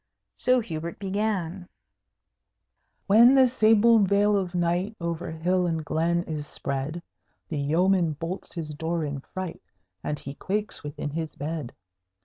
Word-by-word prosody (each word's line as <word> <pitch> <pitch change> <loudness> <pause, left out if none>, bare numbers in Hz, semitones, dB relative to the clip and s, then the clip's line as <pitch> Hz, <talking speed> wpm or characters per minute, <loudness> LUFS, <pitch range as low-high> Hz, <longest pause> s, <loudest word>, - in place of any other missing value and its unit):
So 255 0 +3
Hubert 170 -5 -5
began: 195 -3 -2 1.4
When 235 +6 +7
the 260 -1 +7
sable 225 -1 +5
veil 205 +1 +3
of 185 -3 -1
night 175 +5 0
Over 170 +1 -3
hill 175 +3 0
and 160 -2 -2
glen 170 +3 +1
is 150 -3 -5
spread, 140 +5 -4 0.5
The 155 - -2
yeoman 170 +3 +2
bolts 165 +5 -6
his 155 -3 -4
door 160 +2 -2
in 140 -1 -4
fright, 185 +4 -6 0.4
And 150 - -2
he 140 - -7
quakes 205 +6 -3
within 145 0 -5
his 160 0 -4
bed. 150 -3 -4
170 Hz, 135 wpm, -26 LUFS, 160-200 Hz, 1.4 s, When